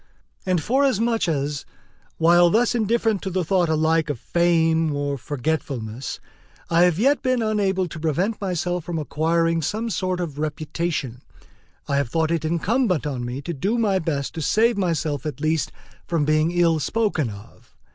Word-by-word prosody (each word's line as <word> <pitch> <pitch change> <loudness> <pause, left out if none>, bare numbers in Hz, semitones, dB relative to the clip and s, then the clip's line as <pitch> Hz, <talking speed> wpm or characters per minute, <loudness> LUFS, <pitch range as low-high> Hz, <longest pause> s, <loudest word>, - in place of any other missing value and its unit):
And 180 -4 +1
forasmuch 235 - +2
as, 145 -2 -1 0.5
while 175 +1 +5
thus 225 +6 +2
indifferent 225 -2 +1
to 195 - -3
the 185 0 -1
thought 180 -1 +2
alike 160 0 +2
of 140 -6 -3
fame 165 -2 +2
or 145 0 -1
of 135 - -6
forgetfulness, 130 -3 -3 0.5
I 170 +1 +5
have 175 -3 +2
yet 275 +8 +3
been 255 -3 +1
unable 195 -4 +1
to 165 - -8
prevent 175 +8 -1
myself 180 -2 -2
from 170 0 -4
acquiring 165 +2 +1
some 220 +8 -2
sort 185 0 -1
of 155 -5 -4
reputation, 155 -4 -3 0.7
I 140 - +1
have 140 -4 0
thought 160 +3 0
it 165 -2 0
incumbent 180 - +1
on 135 -4 -3
me 125 +4 -5
to 170 - -4
do 195 - -1
my 205 -5 +2
best 145 -5 -2
to 160 - -5
save 225 - +3
myself 160 -7 -1
at 145 -4 -5
least 155 +1 0 0.4
from 165 -4 0
being 155 +1 +2
ill 170 -2 +2
spoken 190 - 0
of. 100 0 -13
165 Hz, 165 wpm, -23 LUFS, 150-190 Hz, 0.7 s, while